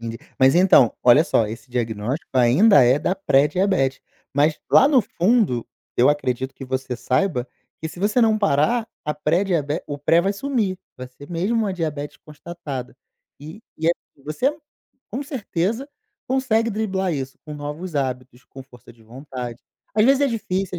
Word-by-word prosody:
Enten 115 Hz, 0 st, -6 dB, 0.2 s
mas 130 Hz, 0 st, +5 dB
então, 175 Hz, -, +5 dB
olha 125 Hz, +6 st, +6 dB
só, 115 Hz, -, +2 dB
esse 115 Hz, +4 st, -9 dB
diagnóstico 120 Hz, +5 st, -3 dB
ainda 135 Hz, -, +6 dB
é 125 Hz, +3 st, +4 dB
da 180 Hz, -, 0 dB
pré-diabetes, 150 Hz, -3 st, +1 dB, 0.3 s
mas 150 Hz, +2 st, +2 dB
lá 275 Hz, -, +7 dB
no 280 Hz, -3 st, +5 dB
fundo, 195 Hz, -, +1 dB, 0.3 s
eu 120 Hz, -, +5 dB
acredito 130 Hz, -3 st, -1 dB
que 135 Hz, -, -9 dB
você 130 Hz, -1 st, -3 dB
saiba 130 Hz, 0 st, 0 dB, 0.3 s
que 160 Hz, -, -4 dB
se 165 Hz, -, -12 dB
você 210 Hz, +6 st, +1 dB
não 220 Hz, -2 st, +3 dB
parar 210 Hz, +5 st, +2 dB, 0.2 s
a 150 Hz, -, -1 dB
pré-diabe 160 Hz, -1 st, 0 dB
o 145 Hz, -, -5 dB
pré 165 Hz, +4 st, +3 dB
vai 195 Hz, +3 st, 0 dB
sumir, 210 Hz, -5 st, -2 dB, 0.2 s
vai 130 Hz, 0 st, -8 dB
ser 145 Hz, +3 st, -14 dB
mesmo 180 Hz, +7 st, -1 dB
uma 215 Hz, -4 st, 0 dB
diabetes 150 Hz, -5 st, -4 dB
constatada. 150 Hz, -5 st, -8 dB, 0.4 s
E 155 Hz, +8 st, -10 dB, 0.2 s
e 160 Hz, +1 st, 0 dB
é -, -, +5 dB, 0.3 s
você 255 Hz, -, -1 dB, 0.5 s
com 255 Hz, +6 st, -3 dB
certeza 235 Hz, -, -3 dB, 0.4 s
consegue 240 Hz, -4 st, +1 dB
driblar 190 Hz, -4 st, -1 dB
isso 135 Hz, -3 st, -5 dB
com 150 Hz, -1 st, -8 dB
novos 150 Hz, +4 st, -6 dB
hábitos, 130 Hz, -2 st, -4 dB
com 135 Hz, -, -12 dB
força 125 Hz, -3 st, -17 dB
de 115 Hz, -1 st, -22 dB
vontade. 125 Hz, 0 st, -8 dB, 0.3 s
Às 215 Hz, 0 st, +4 dB
vezes 270 Hz, +2 st, +4 dB
é -, -, +4 dB
difícil, 195 Hz, -6 st, -3 dB
155 Hz, 165 wpm, -22 LUFS, 130-200 Hz, 0.5 s, lá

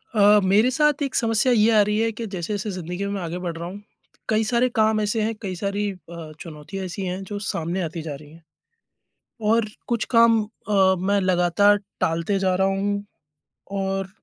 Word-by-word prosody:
अ, 210 Hz, 0 st, +6 dB
मेरे 205 Hz, +6 st, +4 dB
साथ 300 Hz, +1 st, +2 dB
एक 275 Hz, -, -3 dB
समस्या 230 Hz, +1 st, +2 dB
ये 220 Hz, 0 st, +4 dB
आ -, -, +7 dB
रही 210 Hz, +1 st, +1 dB
है 225 Hz, 0 st, +1 dB
कि 230 Hz, +2 st, -6 dB
जैसे-जैसे 200 Hz, +1 st, -4 dB
ज़िंदगी 180 Hz, +1 st, -4 dB
में 200 Hz, -, -3 dB
मैं 195 Hz, -, -3 dB
आगे 170 Hz, 0 st, -4 dB
बढ़ 175 Hz, -2 st, -4 dB
रहा 170 Hz, +1 st, -5 dB
हूँ, 200 Hz, +3 st, -8 dB, 0.5 s
कई 220 Hz, 0 st, +2 dB
सारे 240 Hz, +3 st, +2 dB
काम 220 Hz, 0 st, +3 dB
ऐसे 210 Hz, +2 st, 0 dB
हैं, 220 Hz, +1 st, 0 dB
कई 190 Hz, -4 st, -4 dB
सारी 200 Hz, +2 st, -2 dB
अ, 170 Hz, -4 st, -10 dB
चुनौतियाँ 165 Hz, +4 st, -7 dB
ऐसी 185 Hz, +2 st, -6 dB
हैं 185 Hz, +1 st, -3 dB
जो 205 Hz, +1 st, -6 dB
सामने 175 Hz, -2 st, -2 dB
आती 165 Hz, 0 st, -4 dB
जा 155 Hz, -2 st, -5 dB
रही 145 Hz, +1 st, -14 dB
हैं। 165 Hz, +1 st, -17 dB, 1.1 s
और 230 Hz, 0 st, +3 dB, 0.2 s
कुछ 235 Hz, -2 st, 0 dB
काम 230 Hz, -1 st, +6 dB
अ, 200 Hz, -3 st, +1 dB
मैं 200 Hz, +3 st, +1 dB
लगातार 185 Hz, +2 st, +3 dB, 0.2 s
टालते 170 Hz, +3 st, 0 dB
जा 190 Hz, -1 st, +1 dB
रहा 190 Hz, +1 st, +2 dB
हूँ 200 Hz, +1 st, -1 dB, 0.7 s
और 195 Hz, -1 st, -2 dB
200 Hz, 195 wpm, -23 LUFS, 180-215 Hz, 1.1 s, आ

